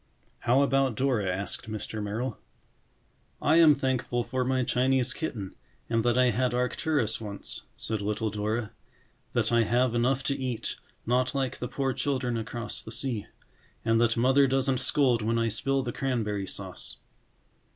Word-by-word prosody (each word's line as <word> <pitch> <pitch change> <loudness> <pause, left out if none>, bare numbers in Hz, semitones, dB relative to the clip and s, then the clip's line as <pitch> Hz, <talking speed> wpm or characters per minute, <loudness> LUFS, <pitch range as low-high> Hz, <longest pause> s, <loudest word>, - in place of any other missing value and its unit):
"How 130 +4 +3
about 135 -3 +2
Dora?" 125 -5 +1
asked 100 +4 -4
Mr. 110 0 -4
Merrill. 110 +5 -3 1.0
"I 155 +2 +4
am 160 -3 +8
thankful 130 -3 0
for 130 +2 -1
my 130 0 +1
Chinese 130 +1 +2
kitten 110 - -4 0.4
and 115 -1 +2
that 120 +1 +2
I 125 -1 +5
had 125 +2 +1
Arcturus 125 -2 0
once," 100 -2 -6
said 110 -2 -2
little 105 +1 -1
Dora. 105 +2 -2 0.6
"That - - +1
I 120 0 +5
have 120 +2 +2
enough 125 +3 +1
to 140 - 0
eat, 130 -4 -3 0.3
not 125 +3 +1
like 135 -3 -1
the 125 - -3
poor 135 0 -1
children 130 -4 -1
across 115 +1 -4
the 110 - -9
sea. 120 -5 -2 0.6
And 115 0 +3
that 115 -1 +3
Mother 135 +3 +5
doesn't 135 -1 +1
scold 130 -4 +2
when 115 +2 +1
I 115 0 +2
spill 135 +5 0
the 120 -2 -3
cranberry 105 -7 -1
sauce." 95 -2 -5
120 Hz, 160 wpm, -28 LUFS, 110-130 Hz, 1.0 s, am